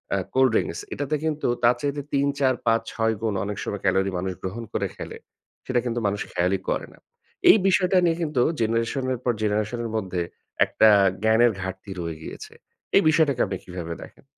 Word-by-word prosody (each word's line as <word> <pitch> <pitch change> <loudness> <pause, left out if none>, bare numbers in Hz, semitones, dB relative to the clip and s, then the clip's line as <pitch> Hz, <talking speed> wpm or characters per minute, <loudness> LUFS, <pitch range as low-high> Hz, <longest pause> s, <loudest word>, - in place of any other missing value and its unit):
আ - - +1 0.2
cold 130 -1 +4
drinks 85 - 0
এটাতে 145 +2 -2
কিন্তু 155 -1 -1 0.2
তার 120 +1 +5
চাইতে 145 0 -1
৩-৪-৫-৬ 130 -5 +1
গুণ 110 -2 0
অনেক 105 -1 -4
সময় - - -4
ক্যালোরি 95 0 +2
মানুষ 95 +1 -2
গ্রহণ 100 +5 -4
করে - - 0
ফেলে। - - -7 0.5
সেটা 125 -1 +1
কিন্তু 120 -1 -1
মানুষ 100 +1 -2
খেয়ালই 90 +2 +1
করে - - -1
না। - - -20 0.5
এই - - +9
বিষয়টা 185 0 +3
নিয়ে 165 -1 +2
কিন্তু 150 -6 0 0.2
জেনারেশন 115 +4 0
এর 125 - -4
পর 120 - +3
জেনারেশন 105 +2 0
এর 115 - -4
মধ্যে 95 -4 -2 0.4
একটা 110 - +4 0.3
জ্ঞানের 110 +2 +5
ঘাটতি 95 +1 -6
রয়ে 85 -2 -4
গিয়েছে। - - -9 0.4
এই - - +6
বিষয়টাকে 150 -5 +3
আপনি 95 -2 -4
কিভাবে 90 -2 -5
দেখেন? - - -16
115 Hz, 175 wpm, -24 LUFS, 95-135 Hz, 0.5 s, এই